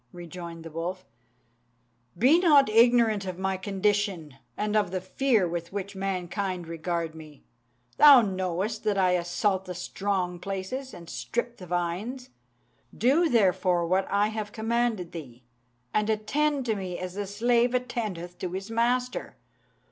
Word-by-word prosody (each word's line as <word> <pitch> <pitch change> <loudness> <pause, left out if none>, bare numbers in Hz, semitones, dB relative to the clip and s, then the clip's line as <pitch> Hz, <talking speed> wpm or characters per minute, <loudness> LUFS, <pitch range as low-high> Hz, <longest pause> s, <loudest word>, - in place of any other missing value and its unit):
rejoined 170 -1 -8
the 165 - -9
wolf, 175 +3 -4 1.1
"be 275 - +5
not 295 -8 +5
ignorant 230 -2 +4
of 185 -2 -5
my 190 0 -1
condition, 195 -4 -1 0.2
and 210 0 -1
of 210 -4 +2
the 185 +1 -2
fear 215 +1 +1
with 170 0 -4
which 200 0 -5
mankind 185 -1 -3
regard 165 0 -3
me. 155 -3 -13 0.5
Thou 285 -4 +9
knowest 190 +1 -2
that 210 -2 +1
I 185 -2 +3
assault 180 +2 0
the 180 - -6
strong 180 -1 -2
places, 195 +9 -5
and 170 -1 -11
strip 235 - -3
the 180 - -10
vines. 185 +10 -3 0.7
Do, 305 +8 +3
therefore, 185 -6 +2
what 185 +3 +1
I 205 +1 +2
have 215 -1 -5
commanded 225 -5 -1
thee, 130 -7 -9 0.5
and 210 0 +1
attend 270 +6 0
to 225 -2 0
me 185 -3 -4
as 185 -1 -5
the 205 0 -4
slave 235 +4 +2
attendeth 215 -9 -3
to 180 -1 -4
his 195 +4 -5
master." 245 +2 -1
195 Hz, 145 wpm, -27 LUFS, 175-230 Hz, 1.1 s, Thou